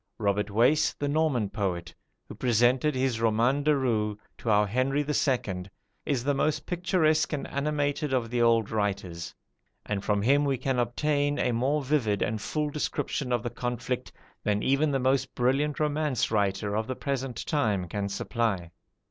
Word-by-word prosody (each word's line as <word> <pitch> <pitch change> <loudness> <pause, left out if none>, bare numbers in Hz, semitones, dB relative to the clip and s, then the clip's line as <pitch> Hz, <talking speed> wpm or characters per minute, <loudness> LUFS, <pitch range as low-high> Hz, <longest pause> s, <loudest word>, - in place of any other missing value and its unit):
Robert 105 -1 0
Wace, 120 +9 +3
the 145 - -3
Norman 145 -7 +1
poet, 90 -5 -3 0.3
who - - -8
presented 125 +5 +2
his 130 -3 0
"Roman 115 +5 +2
de 150 +1 +3
Rou" 110 -5 0 0.2
to 115 - -3
our 105 -1 +4
Henry 130 +7 +1
II., 120 -11 0 0.4
is 130 -5 0
the 145 +2 +1
most 150 +2 0
picturesque 170 -3 +1
and 145 - -2
animated 145 0 -1
of 120 -3 0
the 120 -1 +1
old 115 -2 +3
writers; 95 -5 -2 0.5
and 100 -2 -2
from 105 -1 +1
him 140 +5 +4
we 140 -2 +1
can 130 0 -1
obtain 145 +4 0
a 125 - +1
more 135 +6 +1
vivid 125 -8 +1
and 110 0 -2
full 150 +3 -2
description 145 -2 -2
of 120 -2 +1
the 120 - -3
conflict, 125 0 -3 0.3
than 105 0 0
even 140 +3 +2
the 140 - +1
most 130 0 0
brilliant 135 +4 +1
romance 150 -5 0
writer 100 -1 0
of 110 +1 -1
the 130 - -3
present 135 -3 -3
time 105 - 0
can 100 +3 -3
supply. 100 -4 -2
125 Hz, 165 wpm, -28 LUFS, 105-145 Hz, 0.5 s, our